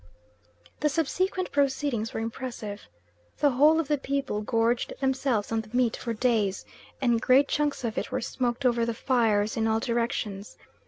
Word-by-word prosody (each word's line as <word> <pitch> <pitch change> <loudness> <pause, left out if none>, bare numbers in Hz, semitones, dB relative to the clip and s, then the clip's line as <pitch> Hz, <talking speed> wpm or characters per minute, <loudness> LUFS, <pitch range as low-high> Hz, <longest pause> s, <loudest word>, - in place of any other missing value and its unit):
The 300 - +2
subsequent 365 +5 -1
proceedings 270 -5 0
were - - -4
impressive. 225 -3 -5 0.6
The 290 - +3
whole 300 +5 +5
of 325 - -1
the 295 -1 +1
people 275 -6 -2
gorged 230 +2 0
themselves 265 -5 0
on 225 0 +1
the 215 - -15
meat 245 -3 +2
for 235 - -4
days, 215 -4 0 0.3
and 240 -3 +2
great 270 +3 +5
chunks 295 -3 -1
of 225 -2 -1
it - - -6
were 255 - 0
smoked 245 +1 -2
over 240 -2 +3
the 230 0 -1
fires 220 -4 +1
in 225 -1 +1
all 220 0 +2
directions. 230 -4 -2
240 Hz, 165 wpm, -27 LUFS, 225-275 Hz, 0.6 s, whole